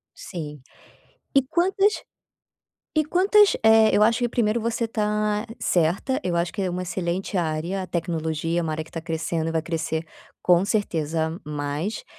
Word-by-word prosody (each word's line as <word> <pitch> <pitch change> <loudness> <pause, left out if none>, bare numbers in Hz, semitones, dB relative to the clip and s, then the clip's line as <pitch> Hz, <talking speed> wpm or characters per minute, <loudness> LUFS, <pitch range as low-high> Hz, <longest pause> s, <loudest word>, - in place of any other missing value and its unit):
Sim. 150 -6 -7 0.7
E 275 - +6
quantas 380 +8 +2 1.1
e 310 - +4
quantas 390 +6 +4
Eh, 220 0 +6
eu 210 - +4
acho 230 +2 +3
que 240 -1 0
primeiro 230 -1 +1
você 230 0 -1
tá 210 0 0
certa, 180 +10 +1
eu 175 - -1
acho 170 0 -1
que 200 - -3
é 185 - 0
uma 180 +1 -3
excelente 180 +2 -3
área, 170 +3 -1
a 185 - -6
tecnologia, 165 -1 -1
é - - 0
uma 160 - -2
área 155 0 -3
que - - -18
tá 165 - -5
crescendo 165 0 -2
e - - -2
vai 160 -1 0
crescer 165 -1 -3 0.4
com 180 +1 +4
certeza 165 -5 -1
mais. 150 +7 -3
180 Hz, 165 wpm, -24 LUFS, 160-220 Hz, 1.1 s, E